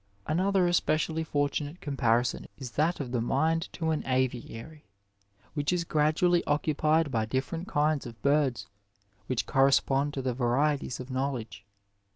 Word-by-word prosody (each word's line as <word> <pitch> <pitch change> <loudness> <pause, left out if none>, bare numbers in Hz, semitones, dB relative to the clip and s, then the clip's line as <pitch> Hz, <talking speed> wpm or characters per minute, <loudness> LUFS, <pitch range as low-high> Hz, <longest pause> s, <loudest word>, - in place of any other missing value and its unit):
Another 185 +4 +2
especially 160 -2 +1
fortunate 145 +2 -2
comparison 120 -4 0
is 130 -4 -7
that 160 +6 +1
of 130 -4 -4
the 120 -2 0
mind 160 +7 0
to 160 -2 -1
an 155 - -1
aviary 130 +3 -2 0.7
which 145 0 0
is 180 -1 0
gradually 165 +3 +2
occupied 155 +1 +1
by 110 -2 0
different 135 - -3
kinds 150 -2 +1
of 115 -1 -11
birds, 140 -7 +2 0.6
which 130 -3 -1
correspond 135 +1 +2
to 135 - -3
the 130 -1 0
varieties 130 +2 0
of 130 +1 -7
know 135 +2 0
ledge. 110 -5 -7
145 Hz, 145 wpm, -28 LUFS, 130-155 Hz, 0.7 s, Another